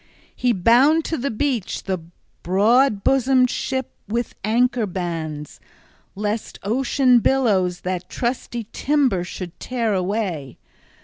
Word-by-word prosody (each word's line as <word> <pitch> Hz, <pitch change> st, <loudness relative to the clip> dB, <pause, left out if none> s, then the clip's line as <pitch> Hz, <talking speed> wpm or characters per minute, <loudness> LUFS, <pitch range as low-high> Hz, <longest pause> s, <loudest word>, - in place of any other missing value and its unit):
He 250 Hz, -, +1 dB
bound 245 Hz, -, +4 dB
to 325 Hz, -, -1 dB
the 280 Hz, +3 st, -1 dB
beach 245 Hz, -3 st, -2 dB
the 190 Hz, -2 st, -2 dB, 0.4 s
broad 210 Hz, +4 st, +3 dB
bosomed 260 Hz, -1 st, +3 dB
ship 260 Hz, -1 st, -3 dB, 0.2 s
with 235 Hz, +2 st, -2 dB
anchor 235 Hz, +1 st, +2 dB
bands, 165 Hz, -5 st, -5 dB, 0.6 s
lest 210 Hz, +2 st, -3 dB
ocean 250 Hz, +3 st, +3 dB
billows 205 Hz, -9 st, +1 dB
that 180 Hz, -1 st, -4 dB
trusty 240 Hz, -1 st, -3 dB
timber 270 Hz, -11 st, +1 dB
should 175 Hz, 0 st, -8 dB
tear 235 Hz, -4 st, -1 dB
away. 185 Hz, -, -2 dB
225 Hz, 115 wpm, -22 LUFS, 185-255 Hz, 0.6 s, bound